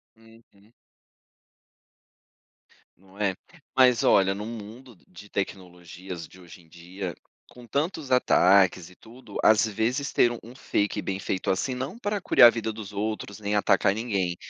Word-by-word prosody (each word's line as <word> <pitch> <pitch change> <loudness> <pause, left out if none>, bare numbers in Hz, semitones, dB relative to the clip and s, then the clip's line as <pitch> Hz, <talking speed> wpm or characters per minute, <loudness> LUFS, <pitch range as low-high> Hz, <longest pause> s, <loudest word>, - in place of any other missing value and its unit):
Uhum. 115 -2 -22 2.3
Não 95 +2 -21
é, 100 -3 0 0.4
mas 125 -3 +5
olha, 95 0 +4
no 105 +1 -6
mundo 115 +2 -10
de 100 +3 -14
tecnologias 90 -3 -6
de 95 - -18
hoje 85 0 -14
em 80 - -24
dia, 90 +2 -7 0.4
com 125 -1 -14
tantos 150 - -3
ataques 95 -7 +4
e 90 - -18
tudo, 115 -2 -15
às 110 +1 +5
vezes 120 +7 -2
ter 120 - +3
um 120 - -5
um 120 +3 -13
fake 105 -4 -1
bem 95 -1 -4
feito 95 -1 -3
assim, 125 +7 -2
não 130 - -5
para 205 -2 -2
curiar 120 - +7
a - - +8
vida 110 -2 -4
dos 105 -2 -9
outros 105 0 -4
nem 105 0 -2
atacar 100 -1 +3
ninguém, 100 -6 -2
105 Hz, 155 wpm, -26 LUFS, 95-120 Hz, 2.3 s, a